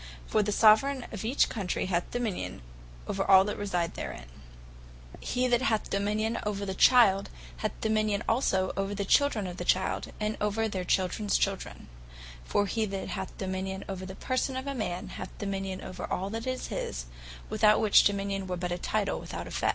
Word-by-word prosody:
For 215 - +2
the 210 0 -1
Soveraign 235 +6 +5
of 215 -2 -5
each 245 +6 +3
Country 195 -6 -2
hath 175 -2 -1
Dominion 225 - -3 0.4
over - - -1
all 190 -1 +7
that 210 - -3
reside 180 -5 -1
therein. - - -6 0.9
He 255 0 0
that 245 0 +3
hath 225 -5 +1
the - - -13
Dominion 215 +3 0
over 205 -1 -2
the 190 - -3
Child, 200 -2 +5 0.3
hath - - -3
Dominion 215 -2 +1
also 190 -6 +2
over 195 +1 -2
their 200 0 -2
Childrens 190 -8 +1 1.2
Children. 190 - -2 0.6
For 205 - +1
he 220 +2 0
that 195 -1 -4
hath 190 -1 -5
Dominion 190 0 -3
over 190 -1 -5
the 190 - -8
person 260 +3 -1
of 260 - -4
a 280 - -2
man, 185 -8 -3
hath - - -8
Dominion 195 -2 -3
over 185 - -6
all 190 +2 -2
that 225 +2 -4
is 255 0 -3
his; - - -4 0.5
without 215 0 +5
which, 215 -2 +6
Dominion 200 -1 0
were 180 -1 -2
but 175 0 -3
a 175 - -2
Title, 210 0 -1
without - - -6
the - - -9
effect. - - 0
200 Hz, 170 wpm, -29 LUFS, 190-220 Hz, 1.2 s, all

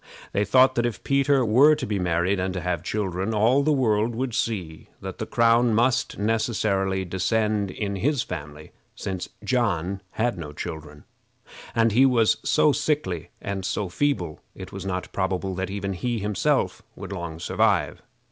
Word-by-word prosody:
They 100 - +2
thought 130 +5 +5
that 120 -1 0
if 120 - -6
Peter 140 -1 +3
were 135 +8 +6
to - - -4
be 105 -2 -2
married, 90 +2 +1
and 95 0 -2
to 90 - -2
have 90 -2 -1
children, 100 0 -2
all 115 +6 +4
the 155 +2 +2
world 115 -4 +1
would 125 0 -2
see 90 -10 -3
that - - -7
the - - -3
crown 115 0 +3
must 130 +3 +1
necessarily 100 -3 0
descend 100 +3 0
in 100 +1 -3
his 140 +6 +1
family, 75 -3 -8 0.2
since 95 -2 -4
John 100 -6 0
had 120 -4 -1
no 75 -3 -7
children, 75 -2 -7 0.7
and 115 -1 +3
he 130 +6 +5
was 115 -4 +3
so 150 - +4
sickly 145 - -1
and 100 -1 -4
feeble 95 - -1 0.2
that - - -8
it - - -10
was - - -6
not 90 -1 -4
probable 95 0 -1
that 95 +1 -3
even 100 0 -3
he 120 +6 -2
himself 105 -2 0
would 100 0 -8
long 85 -4 -5
survive. - - +1
100 Hz, 165 wpm, -25 LUFS, 90-120 Hz, 0.7 s, were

